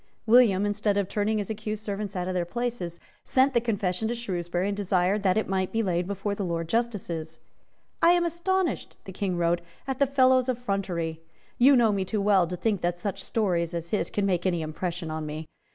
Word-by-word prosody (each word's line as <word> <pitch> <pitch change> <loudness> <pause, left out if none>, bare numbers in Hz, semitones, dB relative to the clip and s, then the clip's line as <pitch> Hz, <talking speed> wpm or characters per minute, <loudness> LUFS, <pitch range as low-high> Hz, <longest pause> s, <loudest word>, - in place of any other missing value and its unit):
William, 220 -4 +5
instead 205 0 0
of 200 -2 +1
turning 210 +2 0
his 205 0 -2
accused 215 0 -4
servants 205 -1 -4
out 180 -1 -2
of 185 - -2
their 180 -1 0
places, 180 -3 -4 0.2
sent 265 +1 +3
the 235 - +3
confession 205 -3 -1
to 235 - -1
Shrewsbury, 180 -5 -2
and 200 - -1
desired 195 0 +1
that 190 -1 +2
it 220 - 0
might 190 -1 -1
be 225 0 0
laid 180 -2 0
before 200 +1 -2
the 200 - -3
Lords 165 -2 -3
Justices. 185 -9 -2 0.6
"I 335 - +6
am 350 -1 +2
astonished," 345 +2 -1
the 190 - -7
King 185 -2 -2
wrote, 170 0 +1 0.3
"at 265 -1 -3
the 280 - +4
fellow's 260 -1 +4
effrontery. 195 -9 -2 0.4
You 270 +3 +7
know 235 -3 +4
me 195 -2 0
too 210 +3 -2
well 195 -3 +4
to 180 +1 -4
think 205 -1 0
that 175 0 0
such 195 +1 -4
stories 175 -7 0
as 170 0 -5
his 210 - 0
can 205 - -1
make 185 -1 +1
any 175 -3 0
impression 165 +1 -4
on 155 -1 -4
me. 155 +1 -5
200 Hz, 210 wpm, -27 LUFS, 175-225 Hz, 0.6 s, You